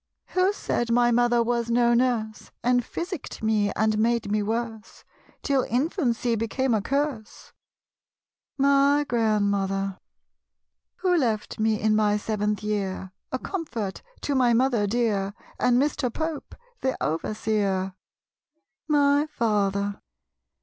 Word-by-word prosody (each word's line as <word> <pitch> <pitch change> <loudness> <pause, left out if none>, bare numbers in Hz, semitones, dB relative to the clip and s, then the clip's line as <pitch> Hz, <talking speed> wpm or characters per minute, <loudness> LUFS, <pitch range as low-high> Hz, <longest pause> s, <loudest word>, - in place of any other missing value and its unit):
Who 370 +1 +2
said 240 - -2
my 240 0 +4
mother 240 0 +3
was 235 0 -1
no 240 0 +3
nurse. 235 -3 0
And 245 0 +3
physicked 340 - -6
me 215 -2 +2
and 215 0 +1
made 230 -1 +1
me 210 0 +2
worse, 225 +1 -4 0.4
Till 275 -2 +2
infancy 250 - 0
became 230 +3 0
a 215 - +2
curse? 275 -2 -3 1.0
My 280 +1 +4
Grandmother. 200 -4 0 1.0
Who 365 -2 +3
left 225 -11 -1
me 215 -1 +2
in 215 0 +2
my 210 -1 +3
seventh 210 0 -2
year, 195 -3 -2 0.2
A 260 - 0
comfort 255 - -4 0.2
to 290 - -1
my 250 -3 +3
mother 235 -3 +2
dear, 205 -3 0 0.2
And 245 0 +3
Mr. 275 -3 0
Pope, 315 +2 -4 0.2
the 260 0 -1
overseer? 195 +2 -1 0.9
My 290 0 +3
Father. 205 -7 0
230 Hz, 120 wpm, -25 LUFS, 210-260 Hz, 1.0 s, my